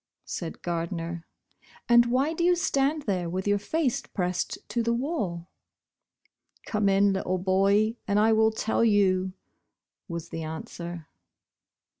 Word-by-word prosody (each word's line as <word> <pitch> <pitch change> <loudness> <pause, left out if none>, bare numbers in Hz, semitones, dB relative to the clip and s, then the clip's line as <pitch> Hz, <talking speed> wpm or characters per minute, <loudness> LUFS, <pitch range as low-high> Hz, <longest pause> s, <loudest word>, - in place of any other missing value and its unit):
said 165 -3 -6
Gardner, 170 0 -3 0.6
"and 235 0 +6
why 265 +6 +1
do 340 - -2
you 355 +1 +5
stand 300 -4 +1
there 180 -6 -1
with 185 +3 -3
your 205 0 +3
face 270 +4 0
pressed 180 -2 -2
to 235 - 0
the 235 0 +1
wall? 210 - -3 0.6
" - - -36
"Come 210 -2 +1
in, 195 0 +4
little 185 -1 -1
boy, 195 +4 +2
and 200 -1 +1
I 220 +2 +4
will 220 0 +4
tell 220 +1 0
you," 190 -4 +3 0.7
was 170 -2 -6
the 165 - -5
answer. 160 +1 -6
200 Hz, 140 wpm, -27 LUFS, 175-235 Hz, 0.7 s, and